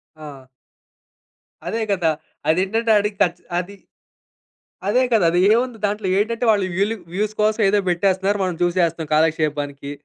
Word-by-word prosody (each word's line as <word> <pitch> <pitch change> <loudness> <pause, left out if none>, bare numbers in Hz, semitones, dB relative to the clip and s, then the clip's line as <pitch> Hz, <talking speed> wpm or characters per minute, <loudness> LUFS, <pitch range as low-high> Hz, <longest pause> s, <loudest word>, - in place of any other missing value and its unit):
ఆ! 145 -4 -11 1.2
అదే 225 - -2
గదా! 175 -5 +1 0.4
అదేంటంటే 195 +7 0
ఆడికి 205 0 -2
కచ్ 175 -1 0 0.2
అది 190 +3 -5 1.2
అదే 250 +5 +3
కదా! 215 -6 +4
అదేముంది 220 +7 +2
దాంట్లో? 205 -1 -2
ఏటంటే 230 +3 -1
వాళ్ళు 200 -3 +1
వీలు 205 +4 0 0.2
వ్యూస్ 210 +3 -1
కోసం 215 +1 +1
ఏదో 205 +1 +3
బెట్టేస్తన్నారు. 190 +3 +1
మనం 180 -2 -2
జూసేస్తన్నాం 170 -2 0
కాలక్షేపానికి. 150 -3 -1
190 Hz, 125 wpm, -21 LUFS, 165-210 Hz, 1.2 s, కదా